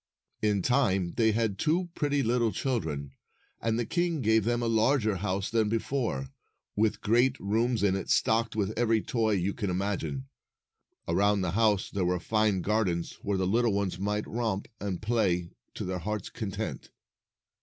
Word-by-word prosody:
In 105 -3 +1
time, 100 -9 +2
they 110 -1 +3
had 110 -3 0
two 175 +3 +1
pretty 145 -4 0
little 120 -1 +2
children, 80 - -2 0.5
and 115 0 0
the 120 - 0
king 170 +1 0
gave 110 -2 +3
them 120 +1 +1
a - - 0
larger 110 -1 +2
house 95 0 -2
than 110 -2 +2
before, 115 - -2 0.4
with 110 +1 +1
great 120 +4 +3
rooms 115 +3 0
in 95 -2 +3
it, 95 - -4
stocked 115 0 +2
with 105 -1 0
every 115 -2 +2
toy 110 -3 +1
you 95 0 0
can 105 -4 -3
imagine. 90 -8 -2 0.8
Around 100 +4 +2
the 90 -2 -1
house 105 0 +2
there 100 -2 -1
were 90 0 +1
fine 110 0 +1
gardens, 100 -6 0
where 100 -1 -1
the 95 - 0
little 115 +3 +2
ones 100 -3 -1
might 105 +2 -1
romp 110 -4 -2
and 100 -2 -4
play 95 -7 +1 0.2
to - - -4
their 90 0 -3
hearts' 105 +1 -4
content. 105 -5 -5
105 Hz, 165 wpm, -29 LUFS, 95-115 Hz, 0.8 s, they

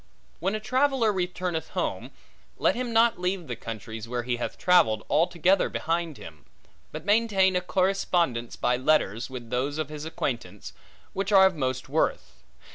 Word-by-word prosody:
When 195 +4 -1
a - - -2
traveller 255 -1 +2
returneth 180 -3 -3
home, - - -2 0.5
let - - +3
him 245 -1 -3
not 230 -2 +3
leave 180 -1 -2
the 125 -4 -5
countries, 115 0 -7
where 120 0 -2
he 120 0 -1
hath 120 - -4
travelled, 110 -13 +3
altogether 175 +3 +3
behind 165 -2 -2
him; 75 -3 -12 0.5
but 155 +2 -7
maintain 205 -3 +3
a 180 - +2
correspondence 180 -9 0
by 125 - +1
letters, 125 -5 +1
with 125 -3 -8
those 135 +4 -1
of 155 -2 -3
his 150 -1 -7
acquaintance, 145 -6 -4 0.4
which 195 +1 -2
are 190 -1 +7
of 190 -2 +2
most 130 -3 -2
worth. 65 - -1
160 Hz, 160 wpm, -26 LUFS, 125-190 Hz, 0.5 s, are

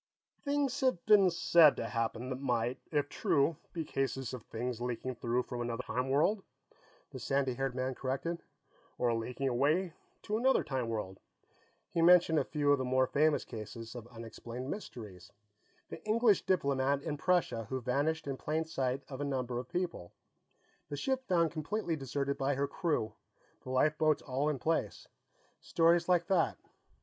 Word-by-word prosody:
"Things 280 -2 0
have 255 -10 +1
been 200 -3 +6
said 170 -3 +6
to - - -3
have - - -5
happened 115 +2 -2
that 130 - -3
might, 125 -1 0
if 145 -2 +1
true, 145 +2 +1
be 165 -2 -4
cases 135 -3 -2
of 125 - -5
things 120 +2 -4
leaking 125 +1 -3
through 120 +1 -1
from 120 -1 -5
another 120 +1 -3
time 125 +1 -2
world," 160 +10 +2 0.7
the - - -7
sandy 135 -2 0
haired 135 0 -2
man 130 +1 -1
corrected. 135 +7 -3 0.6
"Or 120 -1 +2
leaking 125 +4 -2
away 150 +8 +1 0.3
to 210 - -1
another 265 +2 +3
time 130 -4 -2
world." 105 -4 -4 0.7
He 165 - 0
mentioned 170 -2 +6
a - - +1
few 145 -2 +1
of 145 - +4
the - - 0
more 130 +1 +3
famous 150 +3 +2
cases 110 +1 -8
of 120 -2 -8
unexplained 120 +2 -7
mysteries 105 - -8 0.6
the - - -8
English 215 -1 +3
diplomat 140 -5 +1
in 155 -2 -2
Prussia 155 -8 +1
who 130 - -2
vanished 145 +6 0
in 135 -2 -3
plain 155 +3 -1
sight 135 -3 -2
of 135 0 -7
a - - 0
number 130 -3 -2
of 125 - -8
people, 175 - -3 0.8
the 145 - -4
ship 265 - -1
found 170 -3 +3
completely 170 +2 -2
deserted 140 0 -2
by 135 +1 +1
her 140 +1 0
crew, 140 -7 -1 0.5
the - - -10
lifeboats 155 +3 +2
all 140 +2 0
in 150 - -1
place; 160 +6 -1 0.5
stories 170 +1 +3
like 175 -1 +4
that. 180 -3 +2
140 Hz, 170 wpm, -32 LUFS, 125-165 Hz, 0.8 s, been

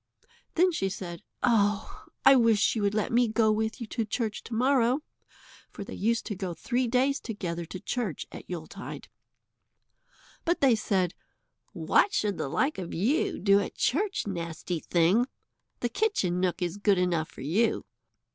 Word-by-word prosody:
Then 360 +2 +4
she 195 - -1
said: 175 -2 -6 0.2
"Oh! 210 -3 +1 0.2
I 270 0 +9
wish 230 -4 +4
you 220 - -1
would 200 0 +1
let 215 - 0
me 240 +1 +4
go 220 0 +3
with 220 +3 -1
you 235 - -4
to 230 +2 -3
the 215 - -3
church 220 -1 -2
to 235 - -7
morrow," 255 +2 +3 0.7
for - - -8
they - - -9
used 230 +3 0
to 210 - -4
go 180 -2 -4
three 245 +9 -1
days 260 +4 +2
together 175 -6 -4
to 185 - -7
church 215 - -3
at - - -10
Yuletide. 180 +3 -7 1.3
But 345 +1 +1
they 270 -3 +5
said: 190 -5 0 0.6
"What 410 - +2
should 205 -3 0
the - - -2
like 260 - 0
of 175 -2 -5
you 240 - +1
do 200 +1 +4
at 200 - -4
church, 390 +9 0
nasty 170 -2 -4
thing? 180 +10 +2 0.5
The 240 - 0
kitchen 235 - 0
nook 180 -1 0
is 175 +2 -2
good 205 -1 +3
enough 175 -3 0
for - - -12
you." 185 - +1
210 Hz, 170 wpm, -28 LUFS, 180-245 Hz, 1.3 s, I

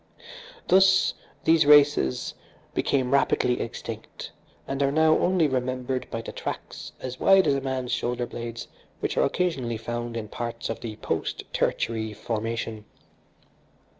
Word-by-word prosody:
Thus, 190 0 +5 0.3
these 160 -2 +4
races 145 - +5 0.4
became 130 -2 +1
rapidly 125 -2 +2
extinct, 115 - -7 0.4
and 135 +1 -2
are 140 0 +3
now 155 +1 +4
only 180 -3 +3
remembered 130 -1 -2
by 115 - -4
the - - -6
tracks - - -6
as 130 0 -6
wide 195 -1 +6
as - - +3
a 135 - -1
man's 130 -2 -3
shoulderblades 120 -1 -3 0.3
which - - -2
are - - +3
occasionally 135 -11 -1
found 120 +1 -4
in 110 -2 -4
parts 115 +2 -5
of 115 - -5
the 110 -2 -6
post - - -3
tertiary 110 -1 -1
formation." 115 0 -4
125 Hz, 135 wpm, -26 LUFS, 115-145 Hz, 0.4 s, wide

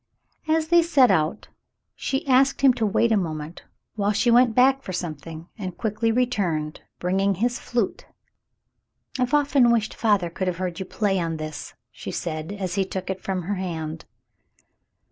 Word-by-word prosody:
As 315 0 +1
they 345 0 +6
set 280 -8 +4
out, 155 -4 0 0.4
she 270 +1 -3
asked 270 +1 +3
him 270 -2 +6
to 225 -3 0
wait 225 +3 +2
a 220 - +4
moment 160 -3 -5 0.3
while 205 -1 0
she 240 +3 +2
went 240 -1 +5
back 265 +2 +4
for 190 - -7
something, 165 -1 -6
and 185 -3 -5
quickly 220 +1 0
returned, 195 -11 -1 0.2
bringing 195 +2 +1
his 240 +6 -1
flute. 235 -5 -2 1.1
"I've 250 +3 +2
often 280 -4 +4
wished 230 -2 +1
father 205 -6 +1
could 185 +2 -3
have 180 -2 -1
heard 180 -2 -4
you 190 - -5
play 195 -2 0
on 165 -2 -2
this," 155 0 -7 0.2
she - - -8
said, 155 0 -4
as 190 -3 -4
he 195 - +1
took 190 0 -4
it 190 0 -6
from 185 -2 -3
her 200 +5 -2
hand. 160 -4 -5
195 Hz, 170 wpm, -24 LUFS, 175-245 Hz, 1.1 s, they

